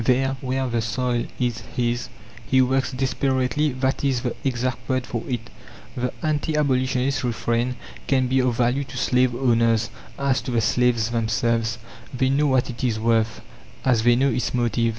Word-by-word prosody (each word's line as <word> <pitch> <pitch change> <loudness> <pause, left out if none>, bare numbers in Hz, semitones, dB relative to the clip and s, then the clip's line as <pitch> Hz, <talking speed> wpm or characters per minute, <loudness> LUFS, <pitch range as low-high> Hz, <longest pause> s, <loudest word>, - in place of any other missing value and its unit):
There, 135 +3 +2
where 130 0 -1
the 120 -2 0
soil 120 +2 -1
is 120 -3 0 0.2
his, 120 0 0 0.3
he 130 +3 +2
works 130 +1 +2
desperately; 130 +2 0
that 130 +2 -1
is 135 -3 +1
the 125 - -2
exact 130 -1 -2
word 130 -1 0
for 120 -3 -3
it. 120 -2 -4 0.4
The 125 -1 -1
anti 155 0 0
abolitionist 130 -1 +1
refrain 120 +1 0 0.3
can 130 -2 +3
be 130 +1 +2
of 125 -2 +1
value 125 +3 +2
to - - -9
slave 125 -1 +2
owners; 115 -3 +2 0.3
as 140 -1 +1
to - - -6
the 120 -2 +1
slaves 120 0 +2
themselves, 115 0 0 0.3
they 130 +1 +1
know 145 +2 +2
what 130 -2 +2
it 120 - -8
is 115 -3 +1
worth, 115 -1 +1 0.4
as 125 -4 +3
they 120 +1 +5
know 135 +3 +3
its 125 0 -1
motive. 115 -1 +1
125 Hz, 170 wpm, -23 LUFS, 115-130 Hz, 0.4 s, they